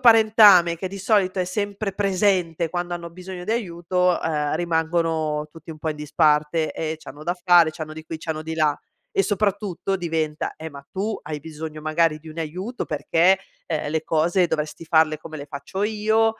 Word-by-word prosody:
parentame 215 -7 +7
che 185 +3 -4
di 195 +1 -7
solito 190 -1 +2
è 185 - +2
sempre 200 +2 -3
presente 185 -4 +1
quando 175 +1 -3
hanno 170 -1 -4
bisogno 180 +1 -8
di 215 - -1
aiuto, 180 -4 0
uhm, 150 -2 0
rimangono 160 -2 0
tutti 165 +1 -12
un 155 - -9
po' 160 +1 -3
in 150 - -5
disparte. 150 +1 +2
E 160 0 -3
c'hanno 150 -1 -11
da 175 +2 -1
fare, 175 -3 +6
c'hanno 155 -1 -7
di 160 0 -9
qui, 160 0 -6
c'hanno 155 -1 -4
di 160 +1 -4
là. 155 -2 +2 0.4
E 195 - +3
soprattutto 200 -2 -1
diventa: 160 -3 -2
"Eh, 160 - -6
ma 140 -1 -11
tu 205 +3 -2
hai 150 0 -5
bisogno 155 0 -7
magari 155 0 +1
di 160 +1 -13
un 155 +1 -9
aiuto 185 +10 -4
perché, 165 +6 +3 0.3
uhm, 155 -3 -1
le 160 0 -1
cose 170 +3 +2
dovresti 155 +2 -3
farle 160 -1 +3
come 160 -1 -9
le 145 -1 -8
faccio 145 +7 -5
io, 220 +1 +2
165 Hz, 185 wpm, -23 LUFS, 155-190 Hz, 0.4 s, parentame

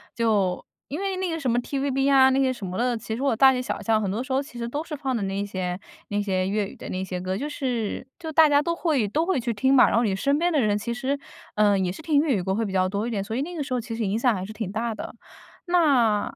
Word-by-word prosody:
就 210 -6 +1 0.2
因 300 +6 -5
为 390 -1 -2
那 370 -1 -1
个 325 - -2
什 260 -5 0
么 240 - +2
TVB 270 +1 0
啊 265 -1 +6
那 265 +1 +2
些 260 -1 +3
什 215 -5 -7
么 180 0 -5
的， 245 -1 +1
其 220 - -6
实 250 - -5
我 275 -5 +2
大 265 +3 +7
街 250 -1 -1
小 255 - -4
巷 220 -1 +2
很 195 - -1
多 220 +6 -2
时 260 - -9
候 265 +1 +2
其 245 -4 -11
实 235 0 -3
都 290 +4 -3
是 310 -3 -6
放 270 -2 -2
的 220 - -2
那 195 +1 -2
些 185 -2 -3 0.3
那 205 0 -1
些 185 -2 0
粤 205 0 0
语 - - -13
的 - - -9
那 185 +1 -3
些 180 -1 -4
歌。 185 +1 -3
就 290 +5 -3
是 250 -3 -3
就 320 -2 -6
大 315 0 +6
家 290 0 +4
都 335 +2 -1
会 305 -10 +1
都 315 +8 0
会 375 -6 +1
去 235 -1 -2
听 265 +5 +2
嘛， 260 - +7
然 - - +1
后 235 - +3
你 195 -3 +1
身 280 +8 +1
边 350 +1 +2
的 295 - +3
人 210 -1 +2
其 235 +3 -3
实， 265 +3 -2 0.4
嗯， 205 -2 +3
也 180 - -1
是 255 - -9
听 300 -2 +3
粤 290 -7 +1
语 - - -1
歌 190 +2 -1
会 225 0 0
比 195 - -4
较 185 -1 +2
多 200 +3 -2
一 - - -2
点， 200 -3 -1
所 220 +3 -5
以 260 - 0
那 350 +5 -4
个 305 - -3
时 260 - -5
候 245 - 0
其 230 0 -7
实 225 - -2
影 200 +3 0
响 240 -1 +3
还 185 -1 -4
是 215 - -8
挺 215 -3 -4
大 225 +1 -2
的， - - -7 0.5
那 270 - +3
嗯。 - - -13
235 Hz, 345 characters per minute, -25 LUFS, 205-280 Hz, 0.5 s, 大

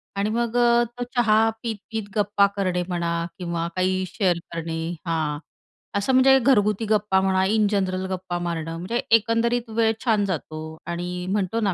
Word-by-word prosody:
आणि 200 +1 0
मग 235 +1 -1
अ, 240 0 +4
तो 240 +1 -6
चहा 225 -2 +4
पीत-पीत 220 0 -4
गप्पा 205 -1 +3
करणे 185 -3 0
म्हणा 170 -2 -1
किंवा 170 -2 -3
काही 185 0 +1
शेअर 180 -2 0 0.2
करणे 165 -1 -3 0.3
हां. 155 -3 -1 0.6
असं 200 +6 0
म्हणजे 265 +1 +6
घरगुती 225 -4 +2
गप्पा 210 -3 +2
म्हणा, 190 0 +2
इन 215 +1 +2
जनरल 185 -2 0
गप्पा 180 -1 -3
मारणं, 165 -2 -3
म्हणजे 205 +8 -2 0.2
एकंदरीत 230 +1 0
वेळ 225 0 +2
छान 215 -4 +3
जातो 160 -4 -4 0.3
आणि 180 +1 -4
म्हणतो 200 +2 0
ना 200 -3 +1
200 Hz, 160 wpm, -24 LUFS, 180-225 Hz, 0.6 s, म्हणजे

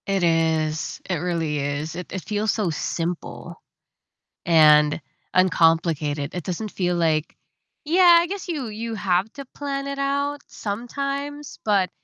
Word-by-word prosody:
It 195 -2 +1
is, 160 -2 +1
it 180 - +1
really 165 -3 -1
is. 145 +3 -3
It 180 0 -7
it 190 - -5
feels 210 0 0
so 210 -5 -1
simple 165 +2 -4 0.8
and 150 -2 +5 0.3
uncomplicated. 165 -5 +2
It 175 - -3
doesn't 195 +5 -4
feel 180 -2 0
like 160 -2 0 0.5
yeah, 345 +2 +7
I 345 - -2
guess 390 +1 -5
you 300 -8 -3
you 225 +1 -5
have 195 0 0
to 280 -1 -8
plan 280 -1 -3
it 280 0 -4
out 280 +1 -1
sometimes, 275 +6 -5
but, 200 -4 +2
185 Hz, 140 wpm, -23 LUFS, -, 0.8 s, yeah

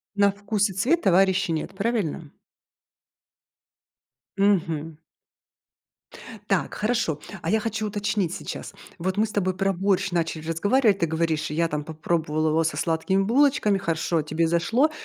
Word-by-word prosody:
На 200 0 +4
вкус 205 0 -1
и - - -6
цвет 265 - +1
товарищей 190 -1 +3
нет, 160 +4 -3
правильно? 195 -9 -2 2.1
Мгм. 165 -6 0 1.5
Так - - 0
хорошо, 215 -9 0 0.2
а 165 - -2
я 220 - +2
хочу 220 -1 -2
уточнить 205 -3 -1
сейчас. - - -7 0.2
Вот 185 +3 -2
мы 215 +1 +2
с - - -9
тобой 185 -3 0
про 195 +1 +1
борщ 195 +1 0
начали 160 -2 -2
разговаривать. 205 +5 +2
Ты 170 - +3
говоришь, 160 -1 -1
я 165 +2 +1
там 150 -1 -3
попробовала 160 -1 -1
его 160 +1 +2
со 160 - -1
сладкими 170 +4 +1
булочками, 245 -3 +3
хорошо, 165 -2 -1
тебе 160 +2 0
зашло, 225 - +2
185 Hz, 140 wpm, -24 LUFS, 160-205 Hz, 2.1 s, На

